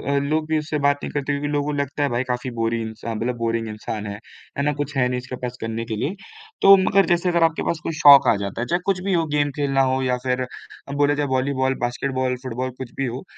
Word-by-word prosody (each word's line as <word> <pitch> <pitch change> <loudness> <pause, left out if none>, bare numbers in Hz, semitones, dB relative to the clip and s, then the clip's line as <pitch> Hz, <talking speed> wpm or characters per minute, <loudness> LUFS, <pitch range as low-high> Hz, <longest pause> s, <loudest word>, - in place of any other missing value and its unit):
अ, - - +3
लोग 155 +2 -1
भी 160 - +2
उससे 150 0 -3
बात 145 0 +2
नहीं - - -4
करते 145 0 -2
क्योंकि 140 +1 -2
लोगों 145 +1 -1
लगता 140 +1 -1
है 140 - +1
भाई 120 +2 0
काफ़ी 125 0 -3
बोरिन 115 0 -1
इंसा 110 +1 -6
मतलब 120 +3 -2
बोरिंग 115 -1 -1
इंसान 105 0 -5
है, 100 0 -6 0.4
है 140 - 0
ना? 150 +1 +1
कुछ 145 0 -4
है 125 -1 +3
नहीं 125 - -1
इसके 125 +1 -7
पास 125 -1 -6
करने 115 +1 -3
के 115 -1 -4
लिए। 145 - -2 0.5
तो 195 0 +9
मगर 195 +1 +3
जैसे 175 0 +1
अगर 170 -1 +2
आपके 165 0 +1
पास 165 - -1
कोई 165 - -3
शौक 140 -3 +8
आ - - +5
जाता 100 +2 -4
है, - - -1
चाहे 175 - +1
कुछ 195 -2 +1
भी 195 0 0
हो, 165 -2 +2
गेम 145 -1 +1
खेलना 135 -2 +1
हो 130 0 0
या 125 -1 +1
फिर 125 0 0
अ, - - -6 0.5
बोले 145 0 +3
चाहे 145 0 -1
वॉलीबॉल, 130 0 0
बास्केटबॉल, 130 +1 -1
फुटबॉल 130 0 -3
कुछ 130 -2 -7
भी 135 - 0
हो, 125 +1 -5
135 Hz, 260 wpm, -22 LUFS, 120-145 Hz, 0.5 s, तो